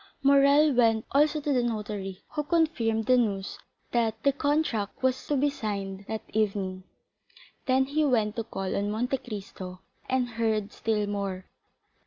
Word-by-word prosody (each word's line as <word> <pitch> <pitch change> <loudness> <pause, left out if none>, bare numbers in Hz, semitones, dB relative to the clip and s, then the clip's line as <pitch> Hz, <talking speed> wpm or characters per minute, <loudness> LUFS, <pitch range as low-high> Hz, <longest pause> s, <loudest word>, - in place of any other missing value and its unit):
Morrel 280 +2 +5
went 225 -3 +3
also 300 +2 +3
to 290 -1 0
the 250 - +3
notary, 210 -5 -4
who 300 - -2
confirmed 295 -9 +1
the 255 +2 +5
news 200 -5 -1 0.3
that 230 -2 +1
the 280 - +4
contract 285 -8 -1
was 260 0 0
to 290 - +1
be 285 +2 +3
signed 200 -7 -4
that 220 -1 -4
evening. 195 -3 -1 0.8
Then 260 0 +3
he 300 +3 0
went 225 -6 +2
to 230 - -1
call 195 -4 -4
on 200 +1 0
Monte 245 +5 0
Cristo 195 -6 -8 0.3
and 255 -1 +1
heard 220 -3 -1
still 215 -2 0
more. 200 -2 -3
225 Hz, 155 wpm, -28 LUFS, 205-275 Hz, 0.8 s, Morrel